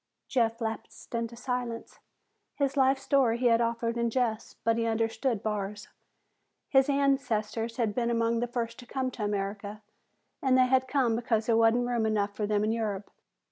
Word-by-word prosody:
Jeff 230 -2 +1
lapsed 225 +1 -6
into 230 0 -2
silence. 245 -1 -4 0.6
His 280 -1 0
life 270 0 +4
story 265 -4 +2
he 250 - -2
had 230 -1 +5
offered 230 0 -1
in 235 0 +1
jest, 230 -2 -2
but 230 0 +3
he 230 0 0
understood 225 0 0
Barr's. 205 -1 -3 0.8
His 270 0 +4
ancestors 240 -5 0
had 225 -4 0
been 235 +1 0
among 230 0 +1
the 240 - -1
first 235 -1 -4
to 245 - -11
come 260 0 -2
to 225 - -5
America, 205 +1 -3 0.6
and 260 -2 +3
they 255 - +6
had 260 0 +2
come 255 -5 +2
because 225 -2 0
there 230 - +3
wasn't 230 +2 +4
room 240 -2 0
enough 205 -2 0
for 210 - -2
them 210 0 +1
in 215 - +1
Europe. 210 -3 -3
230 Hz, 180 wpm, -29 LUFS, 220-250 Hz, 0.8 s, they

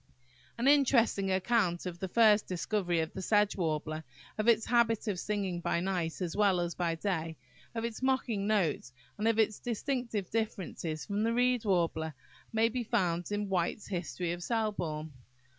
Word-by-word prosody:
An 240 +3 0
interesting 240 -8 +4
account 190 -2 +1
of 175 -1 -5
the 190 - -3
first 215 +1 +4
discovery 180 -1 0
of 160 - -4
the 190 - -5
Sedge 210 +2 +2
Warbler, 155 -3 -2 0.3
of 215 +1 -2
its 225 -1 +4
habit 235 -2 +2
of 195 -4 -1
singing 195 -3 -2
by 170 - 0
night 180 -2 -2
as 170 - -3
well 200 -3 +3
as 175 0 -1
by 170 -1 -1
day, 165 -3 -2 0.4
of 225 0 -1
its 235 0 -5
mocking 255 -6 0
notes, 175 - +1 0.3
and 215 - +1
of 225 -1 +3
its 215 -2 +2
distinctive 235 -4 -2
differences 185 -7 -3
from 205 0 -2
the 230 +1 +1
Reed 245 -1 +2
Warbler, 165 -5 0 0.4
may 225 0 +3
be 245 +2 -2
found 180 -6 0
in 205 0 -1
Whites' 190 +2 -1
History 175 -2 -3
of 175 0 -4
Selborne. 175 -8 -2
200 Hz, 170 wpm, -31 LUFS, 175-225 Hz, 0.4 s, interesting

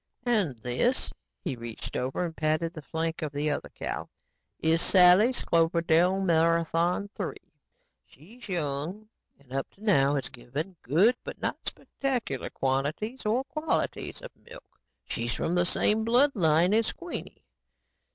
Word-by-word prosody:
And 205 - +1
this," 125 - 0 0.3
he 160 -8 -2
reached 115 -1 -7
over 130 +7 -1
and 165 -2 -6
patted 155 +2 0
the 155 - -8
flank 160 +2 -3
of 155 -2 -2
the 145 +1 -1
other - - -3
cow, - - -5 0.5
"is 165 +1 +2
Sally's 190 +8 +6
Cloverdale 170 +2 +3
Marathon 170 +1 +2
III. - - -2 0.7
She's 225 +9 -15
young 170 +5 -3 0.3
and 135 -2 -16
up 135 0 -2
to 205 - -17
now 145 -9 +4
has 135 - -2
given 145 +8 -6
good 185 - +4
but - - -7
not - - -2
spectacular 245 - -3
quantities 150 - -2
or 240 +5 +2
qualities 305 - -2
of - - -8
milk. - - -14 0.3
She's 115 0 -2
from 170 - -1
the 175 -1 +3
same 215 +4 +2
blood 245 +6 +4
line 170 -1 +3
as 225 +1 +2
Queenie. 350 0 -8
170 Hz, 140 wpm, -28 LUFS, 145-215 Hz, 0.7 s, Sally's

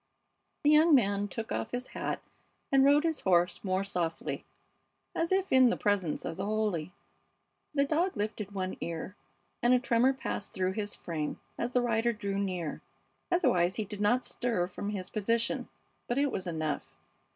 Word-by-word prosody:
The 295 - +5
young 310 +1 +7
man 205 -4 +2
took 220 +2 -5
off 220 - -2
his 245 +2 -4
hat - - -3 0.5
and 270 -1 +6
rode 285 +2 +5
his 325 -2 0
horse 175 -1 +2
more 190 -1 0
softly, 175 -4 -2 0.7
as 335 +1 -1
if 385 0 +1
in 260 -1 +7
the - - 0
presence 195 -7 0
of 165 - -4
the 195 - -2
holy. 210 -6 -1 0.8
The 280 -1 +4
dog 325 - +1
lifted 210 -1 -3
one 185 -2 -3
ear, 170 +3 -4 0.5
and 245 +1 +5
a - - +4
tremor 245 +2 +3
passed 235 -6 -5
through 185 0 +1
his 205 +1 -3
frame 155 -3 -4 0.2
as 240 +1 -3
the 250 - +4
rider 235 0 +2
drew 200 -2 -3
near; 180 -6 -2 0.5
otherwise 180 - +3
he 215 - -2
did 205 0 -6
not 245 +5 +3
stir 230 -8 -1
from 190 +3 -5
his 195 -3 -4
position; 230 +2 0 0.4
but 240 - -1
it 285 -1 +2
was 185 - -3
enough. 155 -3 -3
210 Hz, 175 wpm, -30 LUFS, 185-250 Hz, 0.8 s, young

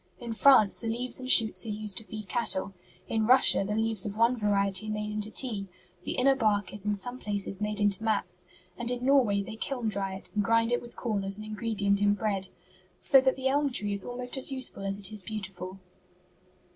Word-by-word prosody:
In 235 -2 -6
France 225 -4 +5
the 230 - -6
leaves 245 +3 0
and 255 0 -7
shoots 225 -4 +6
are - - -4
used 210 -1 0
to - - -12
feed 215 -2 -8
cattle. 200 -4 +1 0.3
In 220 -1 -1
Russia 255 -5 +6
the 210 +2 -3
leaves 220 -2 0
of 205 0 -3
one 230 +2 +3
variety 200 -2 0
are - - -3
made 210 0 -4
into 210 0 -3
tea. 215 -5 -2 0.4
The - - -3
inner 270 +2 +3
bark 205 -6 0
is 205 0 -7
in 205 - +1
some 245 +6 -8
places 200 -2 -2
made 210 0 -2
into 205 0 +1
mats, 200 -5 -2 0.3
and 240 0 -3
in 245 0 -3
Norway 245 -8 +3
they 220 +2 -9
kiln 245 -1 -3
dry 195 -2 -3
it 190 - -10
and 210 -1 0
grind 230 +2 +2
it 245 - 0
with 240 -1 -11
corn 215 -5 -3
as 195 +1 +2
an 215 - -8
ingredient 210 -2 -1
in 205 0 +3
bread. 200 -3 -2 0.5
So 270 - +5
that 260 0 +1
the 265 0 -2
elm 285 +1 +1
tree 205 -4 -1
is 200 -1 -4
almost 245 +2 -4
as 265 - +2
useful 260 -7 -2
as 195 0 0
it 200 -1 -3
is 210 - 0
beautiful." 190 -3 -6
215 Hz, 220 wpm, -28 LUFS, 200-240 Hz, 0.5 s, shoots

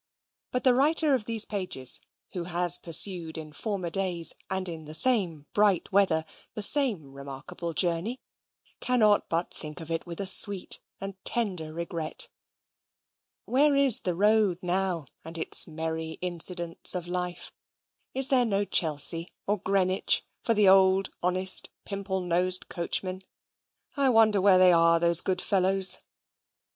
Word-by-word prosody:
But 250 - -4
the 255 - +3
writer 295 +3 +3
of 245 -5 -2
these 225 -1 +4
pages, 180 - +3 0.3
who 175 -2 -6
has 175 0 +2
pursued 170 -1 +2
in 155 -1 -10
former 190 -3 -5
days, 180 -3 +1 0.2
and 190 0 -3
in 165 -2 -9
the 155 +1 0
same 175 - +1
bright 205 -4 0
weather, 185 -5 +1 0.3
the 215 - -3
same 205 - +2
remarkable 140 +5 -9
journey, 175 - -2 0.6
cannot 215 -5 0
but 170 +1 -4
think 150 +1 -5
of 165 -1 -9
it 165 +1 -4
with 170 -1 -9
a 200 - -3
sweet 190 0 +2 0.2
and 195 -1 -10
tender 185 -9 -3
regret. 165 -1 -3 1.2
Where 285 +3 +1
is 275 -4 +5
the 180 -2 -4
road 210 -1 +1
now, 180 -3 -3 0.2
and 165 +1 -8
its 160 - +2
merry 160 0 -6
incidents 175 0 +1
of 180 -2 -5
life? 180 0 -6 0.6
Is 265 +1 +5
there 260 -3 +3
no 200 -1 -2
Chelsea 165 -1 +2
or 205 0 -2
Greenwich 190 0 0 0.2
for 230 - -1
the 210 -2 +2
old 190 0 +2
honest 185 +1 +3 0.2
pimple 195 -1 -5
nosed 180 +1 0
coachmen? 185 +2 -4 0.7
I 280 -2 0
wonder 220 -4 +2
where 185 -2 +4
are 170 0 +2
they, 170 - -2
those 170 0 +4
good 185 -1 -3
fellows? 190 -1 +1
185 Hz, 145 wpm, -25 LUFS, 170-205 Hz, 1.2 s, is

